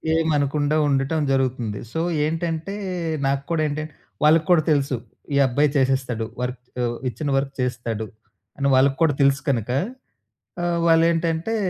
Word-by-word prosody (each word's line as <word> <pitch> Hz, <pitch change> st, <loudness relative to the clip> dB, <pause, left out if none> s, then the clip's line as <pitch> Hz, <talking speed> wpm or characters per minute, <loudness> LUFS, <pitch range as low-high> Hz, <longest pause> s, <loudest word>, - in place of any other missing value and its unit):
ఏమనకుండా 150 Hz, -2 st, +1 dB
ఉండటం 140 Hz, +3 st, +1 dB
జరుగుతుంది. 125 Hz, -6 st, 0 dB
సో 160 Hz, -, -2 dB, 0.3 s
ఏంటంటే 165 Hz, +3 st, -2 dB, 0.5 s
నాకు 140 Hz, 0 st, 0 dB
కూడా 160 Hz, -2 st, +1 dB
ఏంటంటే 155 Hz, +1 st, -4 dB, 0.3 s
వాళ్ళకి 155 Hz, +1 st, +5 dB
కూడా 160 Hz, -3 st, +5 dB
తెలుసు. 140 Hz, -3 st, +1 dB, 0.4 s
ఈ -, -, +3 dB
అబ్బాయి 145 Hz, +4 st, +2 dB
చేసేస్తాడు. 130 Hz, -4 st, 0 dB, 0.2 s
వర్కు 125 Hz, 0 st, -3 dB, 0.5 s
ఇచ్చిన 145 Hz, +3 st, -4 dB
వర్క్ 135 Hz, 0 st, -1 dB
చేస్తాడు 115 Hz, -3 st, -2 dB, 0.5 s
అని, 140 Hz, 0 st, 0 dB
వాళ్ళకి 135 Hz, +1 st, +3 dB
కూడా 150 Hz, -3 st, +4 dB
తెలుసు 140 Hz, 0 st, +3 dB
కనుక, 120 Hz, -2 st, 0 dB, 0.9 s
ఆహ్, 170 Hz, -1 st, 0 dB
వాళ్ళేంటంటే 165 Hz, +4 st, +2 dB
140 Hz, 130 wpm, -23 LUFS, 130-160 Hz, 0.9 s, వాళ్ళకి